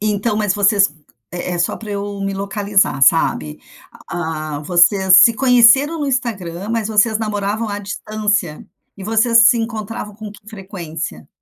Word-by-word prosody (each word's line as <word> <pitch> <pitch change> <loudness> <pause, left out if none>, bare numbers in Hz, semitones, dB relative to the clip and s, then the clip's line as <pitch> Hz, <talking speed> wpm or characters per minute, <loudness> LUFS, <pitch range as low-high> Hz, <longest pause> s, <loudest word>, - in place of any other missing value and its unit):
Então, 210 +1 -1
mas 210 -3 0
vocês 200 -1 +2 0.4
é 180 0 -5
é, - - -4
só 170 - -1
para 215 -2 -10
eu 200 0 -5
me 195 0 -3
localizar, 200 -6 -1
sabe? 130 - +1 0.5
A 155 -3 -5
ah, - - -8
vocês 185 +3 +3
se 230 - +3
conheceram 265 +5 +4
no 290 - -2
Instagram, 205 -8 -4
mas 230 -2 -2
vocês 220 0 +2
namoravam 210 0 -3
à 205 0 -4
distância? 210 -4 -3 0.3
E 195 - -11
vocês 225 +2 +2
se 240 - +2
encontravam 225 -2 -6
com 215 0 -9
que 205 +1 -16
frequência? 170 - -8
205 Hz, 160 wpm, -17 LUFS, 185-220 Hz, 0.5 s, conheceram